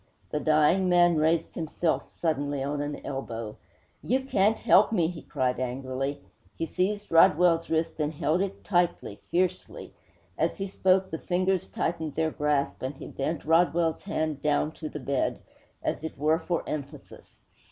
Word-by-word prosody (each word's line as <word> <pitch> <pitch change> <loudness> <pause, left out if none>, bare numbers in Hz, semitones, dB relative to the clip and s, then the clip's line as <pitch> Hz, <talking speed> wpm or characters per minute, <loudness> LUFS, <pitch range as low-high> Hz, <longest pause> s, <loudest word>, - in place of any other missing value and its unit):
The 150 - 0
dying 155 +5 +3
man 175 -2 +5
raised 160 +1 +1
himself 165 0 -1
suddenly 145 -4 -2
on 145 +1 -2
an 145 0 -5
elbow. 115 -5 -5 0.4
'You 260 +3 +1
can't 220 -4 +2
help 205 +4 +5
me!' 180 -7 +2
he 170 -3 -7
cried 125 -1 -1
angrily. 130 +2 -3 0.3
He 165 - -1
seized 205 +5 -2
Rodwell's 165 +1 +5
wrist 160 0 -1
and 150 0 0
held 160 +3 0
it 195 -1 -4
tightly, 175 - 0
fiercely. 180 +1 -2 0.5
As 165 +2 0
he 195 - -3
spoke, 190 0 +2
the 160 - -3
fingers 185 0 0
tightened 160 -3 -2
their 160 -1 +1
grasp, 150 -2 0
and 130 +2 -4
he - - -9
bent 145 +3 -3
Rodwell's 165 0 +2
hand 155 -7 -2
down 150 0 +1
to 155 -1 -7
the 150 - -6
bed, 135 0 -1 0.5
as - - -2
it 160 - -6
were 155 +3 +2
for 175 -2 -2
emphasis. 145 -1 -8
160 Hz, 160 wpm, -27 LUFS, 145-175 Hz, 0.5 s, man